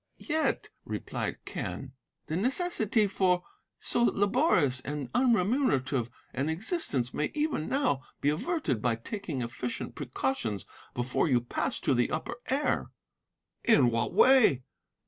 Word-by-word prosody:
"'Yet,' 315 -1 0
replied - - -4
Quen, - - -5 0.3
'the 155 - -3
necessity 235 - +2
for 185 -2 +1 0.3
so 240 - -1
laborious 205 - +3
and 140 -1 -5
unremunerative 200 - +2 0.2
an 140 +4 -1
existence 160 - -1
may 150 - 0
even 300 - -1
now 265 - +1 0.2
be 145 - +2
averted 155 - -1
by 120 -1 +2
taking 145 - -4
efficient 120 +1 -4
precautions 125 - -2 0.3
before 125 +5 0
you 125 -5 +4
pass 120 - -2
to 145 - +2
the 120 -1 +2
Upper - - -3
Air.' 280 +3 0 0.7
"'In 140 - +5
what 115 0 0
way? 245 - +6
155 Hz, 125 wpm, -29 LUFS, -, 0.7 s, way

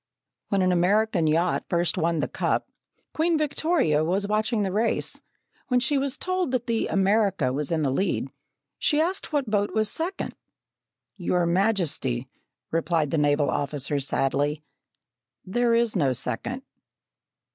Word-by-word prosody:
When 195 -2 +2
an 185 - +3
American 185 0 +2
yacht 165 +3 +1
first 175 -1 +1
won 165 -1 0
the - - -1
cup, - - -1 0.5
Queen 325 +1 +2
Victoria 305 - +1
was 190 +5 0
watching 215 +1 0
the 190 - -1
race. 220 +3 -1 0.5
When 250 -1 +3
she 270 +3 +1
was 275 +1 -1
told 370 -3 -1
that 250 -2 -1
the 230 -2 0
America 195 -8 +2
was 145 +3 -1
in 160 -2 +1
the 135 - +1
lead, 190 +9 -1 0.5
she 300 - +2
asked 350 +3 -1
what 285 -4 0
boat 205 0 0
was 215 -1 +2
second. 340 +4 -2 0.8
"Your 180 -1 +1
Majesty," 170 - 0 0.4
replied 165 -3 0
the 160 - +1
naval 145 0 +2
officer 145 0 -1
sadly, 145 +2 0 0.8
"there 235 +4 +2
is 230 -2 +1
no 140 -8 +2
second!" 250 - -3
195 Hz, 145 wpm, -25 LUFS, 155-235 Hz, 0.8 s, an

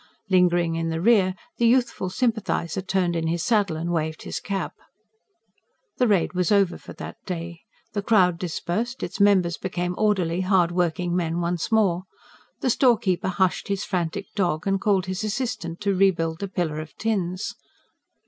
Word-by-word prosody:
Lingering 175 -2 +3
in 165 0 -1
the 160 0 -2
rear, 185 -2 +4 0.2
the 235 - +3
youthful 240 -6 +2
sympathiser 195 - -1
turned 185 -2 0
in 165 -1 -1
his 170 +1 -1
saddle 200 -4 +2
and 170 +2 -3
waved 160 -1 -2
his - - -4
cap. 195 -2 -3 1.2
The 250 - +3
raid 195 -5 +2
was 180 0 0
over 200 -3 +3
for - - -11
that - - -8
day. 170 -1 -5 0.3
The 205 - -1
crowd 185 -5 +3
dispersed; 185 +8 -3
its - - -5
members 190 -4 +4
became 180 -1 -2
orderly, 185 -5 +1
hard 185 -2 +3
working 175 0 0
men 170 -1 0
once 175 +3 -2
more. 190 -5 +2 0.6
The 255 - +2
storekeeper 225 -9 +2
hushed 185 +2 0
his 200 0 -2
frantic 180 +2 -2
dog, 175 -6 0
and 195 -1 +1
called 195 -4 +2
his 185 +2 -3
assistant 215 -7 -3
to 200 -1 +1
rebuild 175 -4 +2
the 200 - -3
pillar 175 -5 -2
of 155 -2 -8
tins. 190 -4 -2
185 Hz, 165 wpm, -24 LUFS, 170-200 Hz, 1.2 s, rear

